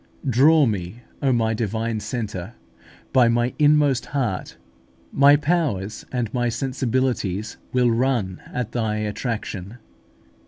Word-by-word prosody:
4). 135 - -1
Draw 145 +5 +5
me, 100 0 -3 0.2
O 135 - +2
my 115 -2 +1
Divine 110 +1 -2
Centre, 105 -2 -5 0.6
by 125 -3 +6
my 120 +1 +1
inmost 145 -4 +3
heart: 120 -10 -3 0.5
my 140 +1 +6
powers 145 - -1
and 120 -4 -2
my 120 -1 +1
sensibilities 120 -5 -1
will 125 -2 +3
run 115 -6 0
at 120 -2 -3
Thy 110 -3 -1
attraction! 105 -1 -4
120 Hz, 120 wpm, -23 LUFS, 105-130 Hz, 0.6 s, by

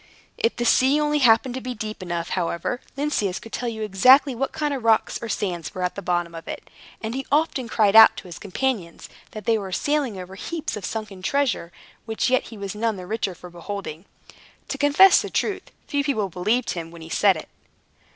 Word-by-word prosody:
If 230 - 0
the 240 - -2
sea 265 +5 +4
only 300 0 +1
happened 240 0 +4
to 260 - -5
be 250 0 -5
deep 215 -2 -6
enough, 170 -2 -3
however, 175 +7 -2 0.2
Lynceus 245 -10 -1
could 225 - -13
tell 245 - -2
you 220 -1 -5
exactly 255 +8 +5
what 265 +3 -2
kind 300 -2 -2
of 265 -4 -4
rocks 225 -1 +2
or 230 - -5
sands 180 -3 -3
were 185 - -3
at 180 - -1
the 200 - -6
bottom 175 -2 -1
of 165 0 -9
it; - - -8 0.3
and 220 +1 -3
he 270 +1 -3
often 285 -4 +1
cried 215 -2 +2
out 225 0 +9
to - - -7
his 175 -3 -10
companions, 205 -4 -3 0.2
that 215 -2 -9
they 225 -1 +2
were 195 -2 -6
sailing 285 -1 0
over 180 +1 -9
heaps 320 - -4
of 210 - -6
sunken 215 -4 -5
treasure, 240 -7 0 0.4
which 225 +3 0
yet 255 - +2
he 225 - -10
was 200 -1 -5
none 220 +1 -1
the 185 -2 -8
richer 200 -2 -2
for 180 +1 -12
beholding. 175 -1 -7 0.6
To 275 - -4
confess 290 +7 +6
the - - -5
truth, 405 - -2 0.2
few 285 -1 -1
people 220 -9 -1
believed 210 +8 0
him 165 -2 -5
when 165 -1 -12
he 160 - -10
said 195 0 +3
it. 155 - -9
220 Hz, 215 wpm, -23 LUFS, 185-260 Hz, 0.6 s, out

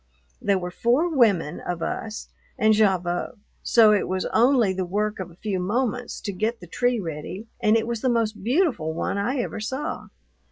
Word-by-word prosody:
There 200 -1 +2
were 180 -1 -4
four 280 - +1
women 195 - +3
of 175 -2 -4
us, 220 -1 -4 0.3
and 215 0 +4
Gavotte, 185 -2 +1 0.2
so 225 -3 +5
it 205 - +1
was 185 0 -1
only 235 -4 +4
the 190 0 -2
work 210 +4 -2
of 185 -2 -5
a 170 - -16
few 195 0 -3
moments 240 +5 -1
to 205 - -3
get 220 +5 -1
the 175 - -11
tree 245 +7 0
ready, 170 +4 -6
and 215 +1 +4
it 225 - -1
was 235 -1 -3
the 260 - +1
most 230 -2 0
beautiful 240 - +1
one 200 - -1
I 245 +7 -1
ever - - -4
saw. 260 +7 -4
215 Hz, 190 wpm, -24 LUFS, 185-235 Hz, 0.3 s, so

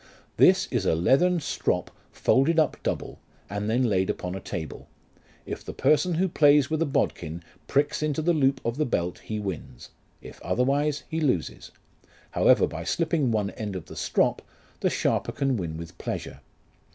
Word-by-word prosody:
This 190 +1 +6
is 115 -7 0
a - - +3
leathern 140 - +3
strop - - -1 0.2
folded 155 +5 +2
up 155 - +3
double, - - -3 0.3
and 100 +1 -2
then 120 +3 +2
laid 95 -5 +1
upon 90 0 -3
a 95 - -4
table; 80 -4 -6 0.6
if - - -6
the - - -7
person 170 +3 +2
who 185 +4 +2
plays 145 -4 +4
with 160 0 0
a 165 - +2
bodkin 85 - -2 0.2
pricks 145 +2 +1
into 155 0 -1
the 175 +2 +3
loop 135 -3 +2
of 115 +2 -1
the 155 - +1
belt 90 -6 -1
he 110 - -5
wins; 95 -11 -6 0.3
if - - -12
otherwise 140 +4 0
he 160 0 -3
loses. 125 - -1 0.6
However - - +4
by 80 +1 -6
slipping 155 - 0
one 105 -2 0
end 105 -3 -5
of 90 -4 -6
the - - -11
strop, - - +1 0.4
the - - +1
sharper - - 0
can 135 -2 0
win 85 -6 -4
with 85 0 -9
pleasure. - - -5
130 Hz, 175 wpm, -26 LUFS, 95-155 Hz, 0.6 s, This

